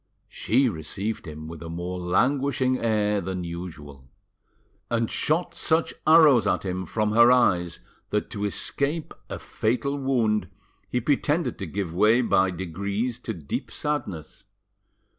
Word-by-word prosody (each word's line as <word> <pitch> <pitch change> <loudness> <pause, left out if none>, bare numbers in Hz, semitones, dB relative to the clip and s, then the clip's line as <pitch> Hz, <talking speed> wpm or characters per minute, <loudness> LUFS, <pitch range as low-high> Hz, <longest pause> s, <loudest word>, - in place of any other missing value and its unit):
She 130 +4 +2
received 100 +2 -4
him 80 0 -8
with 80 0 -9
a 80 - -7
more 90 +2 -4
languishing 130 +7 +1
air 105 -2 +1
than 90 0 -4
usual, 80 -6 -8 0.8
and 115 -1 0
shot 165 +4 0
such 160 0 0
arrows 150 -9 +7
at 100 - 0
him 95 0 -3
froth 105 -1 0
her 120 +2 +7
eyes 90 -9 +2 0.3
that - - -1
to 105 0 -3
escape 140 - -1 0.2
a - - -4
fatal 125 +5 -1
wound 110 -8 +1 0.4
he 125 - 0
pretended 145 +6 0
to 95 - -4
give 90 0 -3
way 110 +7 +4
by 95 -5 +3
degrees 100 +7 -3
to 115 - -4
deep 75 -5 -5
sadness. 100 - -4
105 Hz, 140 wpm, -25 LUFS, 90-125 Hz, 0.8 s, arrows